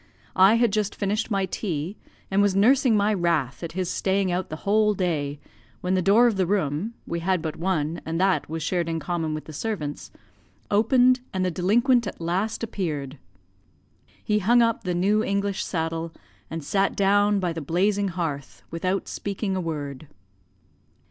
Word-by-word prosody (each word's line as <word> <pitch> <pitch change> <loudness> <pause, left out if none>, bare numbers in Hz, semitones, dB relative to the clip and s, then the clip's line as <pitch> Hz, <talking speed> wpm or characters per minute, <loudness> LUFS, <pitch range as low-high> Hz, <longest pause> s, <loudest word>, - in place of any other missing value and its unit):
I 190 +4 +6
had 230 -3 +2
just 210 -1 0
finished 210 +3 -1
my 195 -3 +1
tea, 175 -2 -3 0.4
and 195 +1 +3
was 200 -2 +2
nursing 235 +2 +4
my 205 +1 +2
wrath 170 -8 0
at 165 -2 -6
his 185 0 -2
staying 190 +1 0
out 180 +1 -2
the 155 - -4
whole 210 +1 +3
day, 150 -6 -2 0.4
when 180 0 -1
the 185 - +2
door 205 +6 +5
of 230 -5 +2
the 185 -2 +1
room 190 +3 -1
(we 170 - -3
had 185 +2 +1
but 160 -1 -4
one, 170 -3 -1
and 165 +1 -3
that 190 -3 +1
was 160 0 -4
shared 170 +1 -1
in 165 0 -1
common 160 0 -2
with 155 - -7
the 155 - -10
servants) 150 -5 -4 0.6
opened, 250 +4 +4
and 185 -1 -1
the 180 - 0
delinquent 235 - +2
at - - -7
last 190 +8 -2
appeared. 150 - -4 1.0
He 210 0 +1
hung 235 +4 +4
up 230 -3 0
the 180 -1 -1
new 205 +5 +2
English 200 -1 -1
saddle, 165 -1 -3 0.4
and 165 -1 -5
sat 195 +6 +1
down 205 +1 +3
by 180 -3 -1
the 165 - -5
blazing 195 +7 +1
hearth 165 -6 -4
without 185 +4 -2
speaking 200 -1 -3
a 185 - -1
word. 150 -3 -5
185 Hz, 175 wpm, -25 LUFS, 165-205 Hz, 1.0 s, I